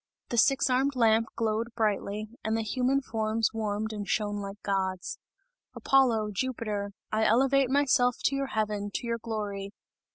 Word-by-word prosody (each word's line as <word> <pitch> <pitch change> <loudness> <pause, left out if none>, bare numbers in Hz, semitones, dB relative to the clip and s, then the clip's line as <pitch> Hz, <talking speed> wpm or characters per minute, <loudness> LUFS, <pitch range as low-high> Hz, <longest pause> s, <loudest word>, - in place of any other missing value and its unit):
The 240 - -2
six 270 +5 +4
armed 265 +2 +1
lamp 225 -2 +3
glowed 225 +1 -1
brightly, 215 -1 -1 0.2
and 220 +1 0
the 225 - -1
human 255 +5 +1
forms 220 -1 0
warmed 220 0 -2
and 205 -2 -5
shone 205 +1 0
like 200 +1 -7
gods. 190 -2 -2 0.6
"Apollo! 235 -6 +3
Jupiter! 210 -4 -3 0.2
I 215 +1 +1
elevate 265 +4 +3
myself 265 -3 +3
to 275 - +2
your 275 0 -1
heaven, 210 -3 -2
to - - -2
your 230 0 -2
glory! 205 -3 -4
220 Hz, 155 wpm, -28 LUFS, 210-250 Hz, 0.6 s, six